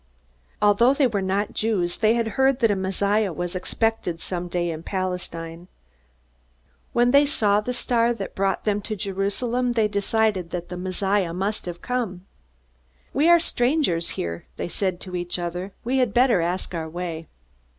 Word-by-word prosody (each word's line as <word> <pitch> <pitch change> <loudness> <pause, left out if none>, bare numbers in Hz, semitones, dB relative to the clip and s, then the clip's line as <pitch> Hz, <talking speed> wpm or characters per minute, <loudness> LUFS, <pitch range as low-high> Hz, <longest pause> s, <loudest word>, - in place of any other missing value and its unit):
Although 235 +6 +5
they 280 - +3
were 215 -5 0
not 195 +2 -1
Jews, 195 -6 0
they 220 +1 +3
had 230 -1 0
heard 265 +4 +2
that 230 -4 +4
a - - +2
Messiah 200 +2 +1
was 175 +3 -4
expected 185 -2 -1
someday 175 -1 -2
in 160 0 -5
Palestine. 175 -2 -4 1.2
When 240 +1 +3
they 285 +2 +6
saw 210 -7 +3
that 210 - -7
the 250 - 0
star 235 -1 +2
had 230 -5 -2
brought 195 0 0
them 205 -1 +1
to 215 +2 -4
Jerusalem, 210 +6 -1
they 225 -2 +3
decided 205 -2 0
that 175 0 -5
the 180 - -5
Messiah 185 0 0
must 200 +1 -2
have 175 -1 -6
come. 225 -8 -2 0.9
"We 300 +5 +3
are 345 - +8
strangers 245 - +1
here," 85 0 -4
they - - -3
said 185 -1 -2
to 185 -2 -6
each 175 0 -2
other. 175 +2 -4
"We 260 +3 +1
had 245 -5 +1
better 240 -7 +5
ask 180 +2 -2
our 160 -2 -3
way." 165 -1 -5
195 Hz, 170 wpm, -24 LUFS, 175-230 Hz, 1.2 s, are